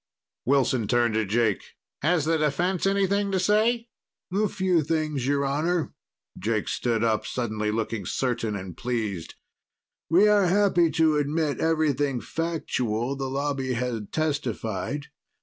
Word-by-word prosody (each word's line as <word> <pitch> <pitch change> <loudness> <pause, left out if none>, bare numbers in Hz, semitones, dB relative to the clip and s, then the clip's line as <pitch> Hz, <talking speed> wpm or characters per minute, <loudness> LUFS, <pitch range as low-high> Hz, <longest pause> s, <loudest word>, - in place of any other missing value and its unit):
Wilson 130 -4 +2
turned 120 -1 +2
to 110 0 +1
Jake. 110 0 +1 0.4
"Has 160 0 +2
the 165 0 +2
defense 175 +6 +1
anything 200 +1 +1
to 190 - +1
say?" 225 +5 +2 0.4
"A 210 +2 +2
few 185 -3 +1
things, 155 -4 -1
Your 140 0 +1
Honor." 155 +4 0 0.5
Jake 110 +2 -1
stood 115 -2 0
up, 110 -2 +1
suddenly 110 -3 -2
looking 110 -3 -2
certain 115 -5 -1
and 95 -3 -6
pleased. 110 -8 -3 0.7
"We 185 +6 +5
are 205 -3 +4
happy 180 -3 +3
to 160 -2 +3
admit 150 0 0
everything 145 -5 +1
factual 130 -7 -2
the 135 -1 -3
Lobby 135 -1 -1
had 115 -4 -3
testified. 140 -3 -2
140 Hz, 130 wpm, -26 LUFS, 115-165 Hz, 0.7 s, We